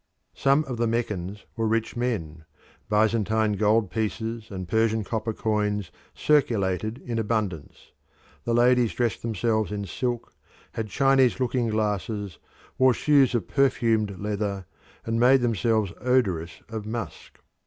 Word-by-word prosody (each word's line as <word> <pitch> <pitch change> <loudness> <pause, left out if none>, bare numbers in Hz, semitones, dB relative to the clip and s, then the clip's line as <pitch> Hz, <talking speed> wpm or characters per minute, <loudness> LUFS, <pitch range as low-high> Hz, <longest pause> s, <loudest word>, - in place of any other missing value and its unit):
Some 140 +3 +3
of 130 -5 -5
the 115 0 +1
Meccans 105 -4 -3
were 115 -1 0
rich 110 0 -1
men; 80 -11 -3 0.4
Byzantine 110 0 +2
gold 105 0 +2
pieces 110 +1 -3
and 95 -2 -6
Persian 110 0 +1
copper 110 +2 -2
coins 105 -3 -1 0.2
circulated 110 -7 +1
in 115 -2 -2
abundance; 105 -8 -3 0.5
the 115 - 0
ladies 120 -1 +3
dressed 120 -3 -1
themselves 110 -2 0
in 100 -1 -3
silk, 120 +5 -3 0.4
had 110 -1 -4
Chinese 135 +1 +3
looking 125 -1 0
glasses, 105 -3 -2 0.4
wore 130 -2 +5
shoes 140 -3 +3
of 120 - -1
perfumed 115 -7 +1
leather, 100 -2 -3 0.4
and 115 0 -1
made 130 +2 +5
themselves 110 -3 +1
odorous 95 -10 0
of 110 -2 -6
musk. 115 +1 -6
110 Hz, 130 wpm, -25 LUFS, 105-120 Hz, 0.5 s, wore